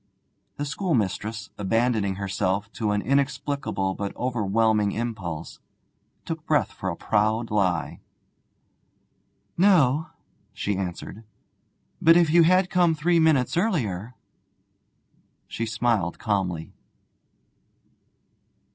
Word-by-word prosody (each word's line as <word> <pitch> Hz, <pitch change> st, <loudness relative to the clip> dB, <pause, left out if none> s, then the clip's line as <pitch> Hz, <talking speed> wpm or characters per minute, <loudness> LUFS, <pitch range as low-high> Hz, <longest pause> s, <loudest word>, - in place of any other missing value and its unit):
The 145 Hz, -, -2 dB
schoolmistress, 110 Hz, -, -2 dB
abandoning 110 Hz, -1 st, +1 dB
herself 100 Hz, +1 st, -2 dB
to 110 Hz, -2 st, -2 dB
an 105 Hz, 0 st, 0 dB
inexplicable 135 Hz, -6 st, -1 dB
but 100 Hz, +1 st, -5 dB
overwhelming 110 Hz, -3 st, +1 dB
impulse, 100 Hz, -9 st, -5 dB, 0.7 s
took -, -, -5 dB
breath -, -, +2 dB
for -, -, -4 dB
a -, -, -3 dB
proud 110 Hz, +2 st, 0 dB
lie. 95 Hz, -5 st, 0 dB, 1.6 s
'No,' 160 Hz, -7 st, +4 dB, 0.5 s
she 105 Hz, -, -2 dB
answered; 95 Hz, +3 st, -5 dB, 0.8 s
'but 165 Hz, +1 st, +7 dB
if 170 Hz, -3 st, +3 dB
you 170 Hz, +1 st, +6 dB
had 185 Hz, +2 st, +4 dB
come 175 Hz, -3 st, +3 dB
three 170 Hz, +3 st, +2 dB
minutes 155 Hz, -6 st, +3 dB
earlier 125 Hz, -, -1 dB, 0.7 s
' -, -, -42 dB
She 115 Hz, -, -4 dB
smiled 110 Hz, -4 st, 0 dB
calmly. 90 Hz, -6 st, -2 dB
115 Hz, 100 wpm, -25 LUFS, 100-145 Hz, 1.6 s, but